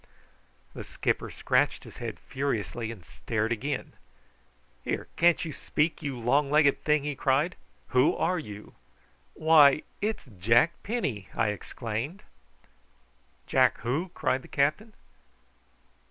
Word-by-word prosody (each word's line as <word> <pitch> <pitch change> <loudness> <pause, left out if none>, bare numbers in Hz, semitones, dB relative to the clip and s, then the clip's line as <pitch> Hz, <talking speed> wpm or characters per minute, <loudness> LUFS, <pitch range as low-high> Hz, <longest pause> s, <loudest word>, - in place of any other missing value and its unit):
The - - -7
skipper - - -2
scratched - - +1
his - - -12
head - - -6
furiously, 115 -4 -3
and 100 -7 -11
stared 105 - -2
again. 130 +5 -3 0.9
"Here, - - -3
can't 170 0 +3
you 155 - -5
speak, 150 +3 -1
you 140 -3 -4
long 140 +5 +2
legged 150 -1 +3
thing?" 150 -1 +2
he 150 0 -2
cried. 140 +6 +1 0.3
"Who 130 +2 +3
are 180 -1 0
you?" 105 -7 -9 0.6
"Why, 155 -2 +6 0.2
it's 215 +2 -2
Jack 115 - +4
Penny!" 145 - -3
I 115 -2 +2
exclaimed. 115 - -5 1.2
"Jack - - +3
who?" 150 +10 -1
cried 130 - 0
the - - -14
captain. 155 +11 0
140 Hz, 125 wpm, -28 LUFS, 115-155 Hz, 1.2 s, Why